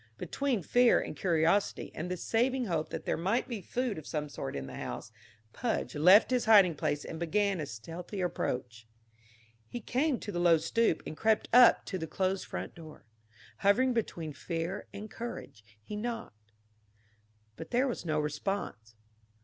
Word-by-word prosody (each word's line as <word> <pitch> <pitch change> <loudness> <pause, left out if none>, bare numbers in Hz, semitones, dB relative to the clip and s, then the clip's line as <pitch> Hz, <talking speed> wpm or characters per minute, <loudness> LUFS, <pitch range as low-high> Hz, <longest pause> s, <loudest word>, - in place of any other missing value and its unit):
Between 260 - -1
fear 245 +8 +4
and - - -5
curiosity 170 +2 +1
and 175 +3 -5
the 180 - -2
saving 250 +7 +1
hope 165 -6 -1
that - - -6
there - - 0
might 200 +10 0
be 235 -6 -5
food 240 -1 -2
of 155 - -12
some 150 -1 -3
sort 70 - -5
in 70 -1 -4
the 65 - -9
house, - - -6 0.4
Pudge 235 -2 -2
left 185 +11 +6
his 250 -1 +1
hiding 200 -6 +7
place 145 0 -2
and 160 - -6
began 195 +3 +1
a 150 - -3
stealthy 165 - -7
approach. 125 -10 -3 0.8
He 240 - -6
came 260 +4 0
to 205 - -5
the 175 - -3
low 170 -1 +5
stoop 220 +2 +1
and - - -6
crept 220 +4 +1
up 245 -1 +7
to 185 - -4
the 160 - -4
closed 190 +4 -1
front - - -5
door. 155 -6 -13 0.5
Hovering 245 +6 +3
between 170 -9 -3
fear 170 +4 -4
and 205 +2 -7
courage, 225 - -8 0.2
he 155 - -8
knocked. 210 - -6 1.0
But - - -9
there 250 +3 +2
was 245 - -3
no 155 -3 0
response. 150 - -3
185 Hz, 170 wpm, -31 LUFS, 155-230 Hz, 1.0 s, hiding